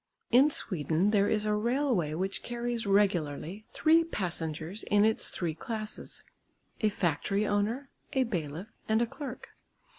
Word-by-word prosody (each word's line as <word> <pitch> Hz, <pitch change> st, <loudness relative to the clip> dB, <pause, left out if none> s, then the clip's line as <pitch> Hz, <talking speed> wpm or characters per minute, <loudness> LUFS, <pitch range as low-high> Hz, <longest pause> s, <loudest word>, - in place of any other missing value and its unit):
In 260 Hz, +5 st, +7 dB
Sweden 175 Hz, -, +1 dB
there 205 Hz, -2 st, +3 dB
is 215 Hz, -1 st, +1 dB
a 210 Hz, -, +2 dB
railway 230 Hz, -, +1 dB
which 190 Hz, +3 st, -2 dB
carries 240 Hz, -2 st, -2 dB
regularly 195 Hz, -1 st, +1 dB
three 325 Hz, +1 st, +4 dB
passengers 170 Hz, -, -3 dB
in 205 Hz, 0 st, +4 dB
its 220 Hz, 0 st, +1 dB
three 170 Hz, -3 st, -2 dB
classes, 215 Hz, +5 st, -5 dB, 0.6 s
a 215 Hz, -, +3 dB
factory 195 Hz, +2 st, 0 dB
owner, 220 Hz, +7 st, 0 dB, 0.2 s
a 265 Hz, -, +3 dB
bailiff 175 Hz, -, -4 dB, 0.2 s
and 220 Hz, +2 st, +4 dB
a -, -, +2 dB
clerk. 260 Hz, +1 st, -8 dB
210 Hz, 140 wpm, -30 LUFS, 175-235 Hz, 0.6 s, In